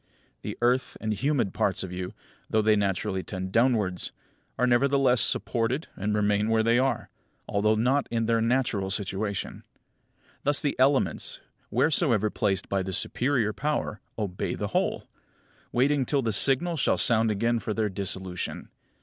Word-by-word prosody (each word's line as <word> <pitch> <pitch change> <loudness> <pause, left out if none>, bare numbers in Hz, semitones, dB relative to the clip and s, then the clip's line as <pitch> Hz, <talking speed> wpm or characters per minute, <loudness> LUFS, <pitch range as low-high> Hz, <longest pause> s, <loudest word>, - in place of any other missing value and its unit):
The - - -6
earthy 125 +1 +1
and 110 -1 -1
humid 125 -2 0
parts 95 - 0
of 95 - -6
you, 90 0 -5 0.4
though 110 -1 +2
they 110 0 +4
naturally 95 -2 -1
tend 95 -1 -6
downwards, 110 -6 +1 0.5
are 125 - +2
nevertheless 130 -1 +3
supported 120 - +1
and 105 +2 -1
remain 105 0 +1
where 110 0 +3
they 115 +2 +3
are, 135 +1 -1 0.4
although 105 +2 +2
not 130 +6 +1
in 115 -1 0
their 115 0 +2
natural 115 -5 0
situation. 100 +1 -3 0.8
Thus 145 0 +2
the 145 - -1
elements, 135 +1 +1 0.3
wheresoever 120 - +2
placed 95 -3 -1
by 100 -1 0
the 95 0 -4
superior 120 0 0
power, 145 -7 -2 0.2
obey 100 -4 -3
the - - -3
whole; - - -1 0.6
waiting 135 +3 +2
till 140 -3 +1
the 115 -2 0
signal 145 - +3
shall - - +2
sound 115 -2 +3
again 115 +3 +1
for 110 -1 -4
their 110 -1 +1
dissolution. 95 -2 -3
110 Hz, 150 wpm, -27 LUFS, 100-130 Hz, 0.8 s, they